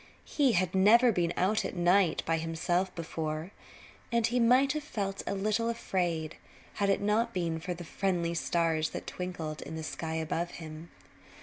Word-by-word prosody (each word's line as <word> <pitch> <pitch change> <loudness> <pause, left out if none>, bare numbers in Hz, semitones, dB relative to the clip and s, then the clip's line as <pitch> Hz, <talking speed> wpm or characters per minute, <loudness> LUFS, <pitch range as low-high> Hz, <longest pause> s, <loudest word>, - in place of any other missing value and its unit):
He 275 -5 +2
had 185 -1 +1
never 225 +6 +6
been 175 -4 0
out 200 +4 +2
at - - -4
night 175 -1 +3
by 165 0 +1
himself 175 +3 -1
before, 160 0 -4 0.6
and 235 -1 +2
he 245 +2 +1
might 255 +4 +5
have 305 - -2
felt 200 -9 -3
a - - -1
little 215 +4 0
afraid 175 -8 -2 0.4
had 200 - +3
it 195 - +2
not 225 +3 +1
been 165 -3 -1
for 180 +2 -4
the 175 - -8
friendly 175 -1 -1
stars 165 -2 +1
that - - -8
twinkled 170 -4 -5
in 160 - -7
the 160 - -5
sky 160 +1 -4
above 165 +2 -2
him. 160 0 -9
180 Hz, 175 wpm, -30 LUFS, 165-210 Hz, 0.6 s, never